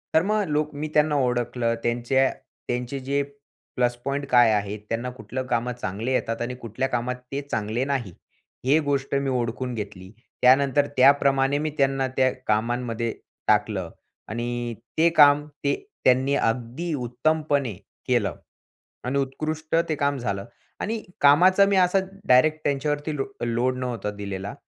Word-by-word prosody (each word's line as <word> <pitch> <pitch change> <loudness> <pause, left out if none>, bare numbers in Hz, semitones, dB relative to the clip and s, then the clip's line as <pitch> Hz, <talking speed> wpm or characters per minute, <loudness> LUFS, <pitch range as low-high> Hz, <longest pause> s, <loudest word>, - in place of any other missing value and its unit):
तर 160 - +5
मग 215 0 +2
लोक 150 0 0
मी 150 +2 -3
त्यांना 150 0 +3
ओळखलं 120 -3 0
त्यांच्या 120 +3 +2 0.4
त्यांचे 125 +2 -2
जे 140 +2 0 0.5
प्लस 120 -1 +1
पॉइंट 140 +1 -1
काय 120 -2 +6
आहेत? 105 0 -1
त्यांना 120 +2 -2
कुठलं 130 +1 -5
कामं 125 0 0
चांगले 115 +1 -4
येतात 115 -2 -1
आणि 120 +1 -3
कुठल्या 125 +2 -3
कामात 125 0 -1 0.2
ते 140 +1 -2
चांगले 110 +4 -1
नाही, 135 -8 -2 0.5
ही 140 +4 +4
गोष्ट 140 -3 -1
मी 140 0 0
ओळखून 125 0 -2
घेतली. 100 -4 -7 0.3
त्यानंतर 140 +2 +4
त्याप्रमाणे 135 +1 +4
मी 155 +1 -1
त्यांना 135 -1 +2
त्या 130 -1 +4 0.2
कामांमध्ये 115 +1 0 0.4
टाकलं 105 -4 +1 0.4
आणि 120 +1 -3 0.2
ते 165 +2 +5
काम 145 0 +7 0.2
ते 140 - +2 0.3
त्यांनी 130 +2 +3
अगदी 125 +8 -1
उत्तमपणे 140 0 0 0.3
केलं 120 -6 +1 0.7
आणि 130 +2 -1
उत्कृष्ट 155 +4 -2
ते 155 - +1
काम 140 -1 0
झालं 100 -5 -3 0.3
आणि 220 +1 -2 0.2
कामाचा 180 +7 +6
मी 200 0 +2
असा 185 +1 +4 0.3
डायरेक्ट 155 +5 +5
त्यांच्यावरती 145 +2 -1
लो 135 - -1 0.2
लोड 120 +2 0
नव्हता 120 -5 -3
दिलेला. 100 +1 -5
130 Hz, 145 wpm, -24 LUFS, 120-145 Hz, 0.7 s, काम